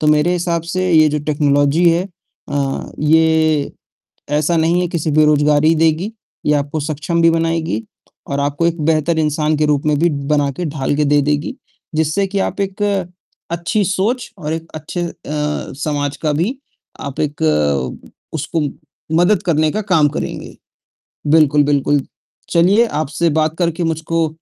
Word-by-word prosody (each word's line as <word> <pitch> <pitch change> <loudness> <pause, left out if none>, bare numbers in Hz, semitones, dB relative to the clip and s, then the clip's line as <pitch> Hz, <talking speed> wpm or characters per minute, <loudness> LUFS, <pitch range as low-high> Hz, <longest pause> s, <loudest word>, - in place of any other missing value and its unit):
तो 150 - 0
मेरे 150 +3 +3
हिसाब 170 -2 -1
से 185 0 0
ये 155 -1 +6
जो 150 0 -1
टेक्नोलॉजी 145 +2 +3
है 170 +2 +1 0.4
अ, 140 -2 -2
ये 160 -1 +3 0.6
ऐसा 150 +3 +1
नहीं 165 +3 +2
है 180 - 0
कि 170 0 -3
सिर्फ 150 -1 -1
बेरोज़गारी 150 +1 +4
देगी, 160 +5 +1 0.3
ये 150 - +3
आपको 145 +2 -2
सक्षम 155 +3 -1
भी 165 - +6
बनाएगी 165 -8 -1 0.4
और 140 - -2
आपको 145 +4 0
एक 170 -2 -2
बेहतर 160 +1 +1
इंसान 150 0 +1
के 155 - +2
रूप 145 -1 +1
में 150 -1 +2
भी 170 +2 +3 0.2
बना 145 -1 +2
के 175 +6 -5
ढाल 145 -2 -1
के 150 - +1
दे 145 0 +3
देगी। 150 +1 -1 0.4
जिससे 160 +5 +1
कि 200 +1 -2
आप 195 - -2
एक 195 +1 -4
अ 200 -3 0 0.5
अच्छी 170 +5 0
सोच 210 +7 -1
और 155 -3 -4
एक 165 0 -5
अच्छे 155 +3 -5
अ, 170 - -3 0.2
समाज 150 -1 -2
का 155 -2 -1
भी 175 - 0 0.4
आप 140 -1 -6
एक 150 -1 -2
अ, 75 -4 0 0.2
उसको 160 +1 -2 0.6
मदद 175 +2 +3
करने 155 -3 +2
का 215 - -2
काम 180 -7 +3
करेंगे। - - -5 0.7
बिल्कुल, 150 -1 +4
बिल्कुल। 145 0 +2 0.5
चलिए 190 +7 +4 0.2
आपसे 155 +3 0
बात 155 0 0
करके 170 0 0
मुझको 165 0 0
155 Hz, 165 wpm, -17 LUFS, 145-170 Hz, 0.7 s, ये